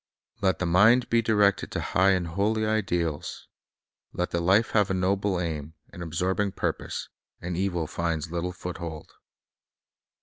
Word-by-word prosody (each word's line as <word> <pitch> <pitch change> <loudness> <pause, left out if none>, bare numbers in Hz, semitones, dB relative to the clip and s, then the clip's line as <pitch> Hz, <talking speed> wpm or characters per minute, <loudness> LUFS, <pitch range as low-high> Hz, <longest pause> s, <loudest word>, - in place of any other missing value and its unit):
Let 95 -3 +2
the 90 - -2
mind 105 +9 +5
be 115 0 +4
directed 105 -3 +2
to - - -1
high 95 +1 +3
and 90 -3 -1
holy 105 +5 0
ideals, 90 -8 -2 0.7
let 90 - -2
the 85 - 0
life 100 +6 +3
have 105 -3 +3
a 95 - 0
noble 95 0 +1
aim, 80 -3 -4 0.2
an 85 - -9
absorbing 95 +4 -1
purpose, - - -3 0.3
and 90 0 -4
evil 90 -3 -1
finds 80 -1 -2
little 85 +1 -2
foothold. 85 -3 -7
90 Hz, 145 wpm, -27 LUFS, 85-100 Hz, 0.7 s, mind